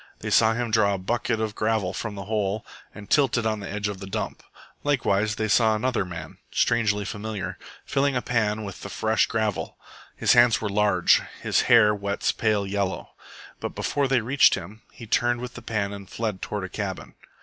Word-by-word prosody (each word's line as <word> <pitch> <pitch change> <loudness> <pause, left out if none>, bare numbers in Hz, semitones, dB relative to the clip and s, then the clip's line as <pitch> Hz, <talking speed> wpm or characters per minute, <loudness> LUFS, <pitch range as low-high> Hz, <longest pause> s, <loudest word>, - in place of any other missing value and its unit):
They - - -4
saw 110 0 +5
him 120 -1 -2
draw 100 -2 +3
a - - -3
bucket 115 +4 -1
of 110 -1 -2
gravel 110 -4 0
from 105 +1 -4
the 100 -1 -7
hole 105 0 -1 0.3
and 105 -1 -11
tilt 135 -5 +3
it 120 - -1
on 110 -1 0
the 100 - -7
edge 105 +1 -2
of 100 -2 -5
the 95 - -8
dump. 105 +3 -4 0.4
Likewise 110 -7 +1
they 110 +1 -1
saw 110 +1 +4
another, 120 0 0
man, 90 -2 -8
strangely 105 -3 +1
familiar, 105 -2 -5 0.3
filling 140 0 +1
a 125 - +1
pan 110 -3 0
with 100 -3 -8
the 100 - -7
fresh 110 +2 +1
gravel. 110 -3 -2 0.4
His - - +3
hands 120 -2 +5
were 105 - -3
large; 105 +1 +3 0.2
his - - +1
hair 115 -3 +7
wets 100 -1 -1
pale 105 -3 0
yellow. 100 -1 -2 0.5
But - - -5
before 140 -1 0
they 130 -2 +2
reached 130 +6 +4
him, 100 +4 -9
he 115 - -11
turned 120 +2 +1
with 125 0 -6
the 120 - -9
pan 105 -3 -2
and 100 -2 -9
fled 110 -5 -3
toward 105 -2 -4
a 95 - -5
cabin. 95 - -5
110 Hz, 200 wpm, -25 LUFS, 100-115 Hz, 0.5 s, hair